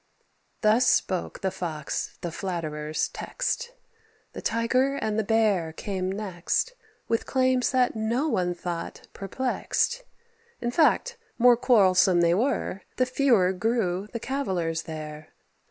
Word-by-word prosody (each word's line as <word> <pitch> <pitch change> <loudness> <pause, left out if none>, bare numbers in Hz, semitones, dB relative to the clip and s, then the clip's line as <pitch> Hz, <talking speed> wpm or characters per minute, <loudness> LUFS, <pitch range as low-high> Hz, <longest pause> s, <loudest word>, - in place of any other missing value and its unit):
Thus 225 +4 +4
spoke 185 -2 0
the 190 - 0
Fox 155 -6 -4
the 170 - -4
flatterer's 155 -4 -3
text. - - -3 0.6
The - - -7
Tiger 255 +4 +1
and 220 -5 -1
the - - +1
Bear 205 -7 +1
came 185 +1 -3
next, 195 - -1 0.3
With 230 - -1
claims 255 -1 +2
that 255 -3 +2
no 230 +7 0
one 180 - 0
thought 170 -1 -6
perplexed. 260 - -1 0.6
In 240 - -2
fact, 405 - +2 0.2
more 245 0 +6
quarrelsome 185 -7 +4
they 170 0 +4
were, 210 -2 0
The 255 - +2
fewer 245 -8 +3
grew 195 -2 -1
the 235 - -4
cavillers 185 -12 -2
there. 155 -2 -8
210 Hz, 125 wpm, -26 LUFS, 175-250 Hz, 0.6 s, more